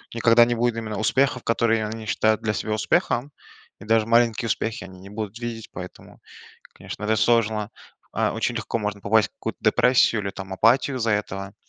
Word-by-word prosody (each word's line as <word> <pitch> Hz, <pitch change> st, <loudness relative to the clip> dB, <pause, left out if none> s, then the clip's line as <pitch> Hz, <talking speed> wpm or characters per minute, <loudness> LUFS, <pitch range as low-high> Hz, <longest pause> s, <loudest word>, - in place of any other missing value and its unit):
никогда 115 Hz, 0 st, +5 dB
не 120 Hz, 0 st, -1 dB
будет 120 Hz, 0 st, 0 dB
именно 110 Hz, -2 st, -4 dB
успехов, 130 Hz, +3 st, +1 dB
которые 115 Hz, -1 st, +1 dB
они 110 Hz, +1 st, -6 dB
считают 110 Hz, +1 st, +1 dB
для 105 Hz, -1 st, -1 dB
себя 110 Hz, +2 st, -4 dB
успехом, 120 Hz, +5 st, 0 dB, 0.5 s
и 100 Hz, -, -12 dB
даже 110 Hz, 0 st, +2 dB
маленькие 115 Hz, 0 st, +2 dB
успехи 110 Hz, 0 st, -2 dB
они 95 Hz, 0 st, -13 dB
не 100 Hz, -, -12 dB
будут 105 Hz, +1 st, -6 dB
видеть. 115 Hz, -2 st, -6 dB
Поэтому, 90 Hz, 0 st, -10 dB, 0.5 s
конечно, -, -, -9 dB
это 110 Hz, +1 st, +1 dB
сложно. 110 Hz, -2 st, +1 dB, 0.4 s
А, -, -, 0 dB
очень -, -, -2 dB
легко -, -, -2 dB
можно 105 Hz, -1 st, -4 dB
попасть 105 Hz, +2 st, +3 dB
в -, -, -45 dB
какую-то -, -, -6 dB
депрессию 125 Hz, -3 st, +3 dB
или 100 Hz, -, -3 dB
там 95 Hz, 0 st, -9 dB
апатию 130 Hz, +6 st, +2 dB
из-за 115 Hz, -2 st, 0 dB
этого. 100 Hz, -1 st, -3 dB
110 Hz, 185 wpm, -23 LUFS, 105-115 Hz, 0.5 s, никогда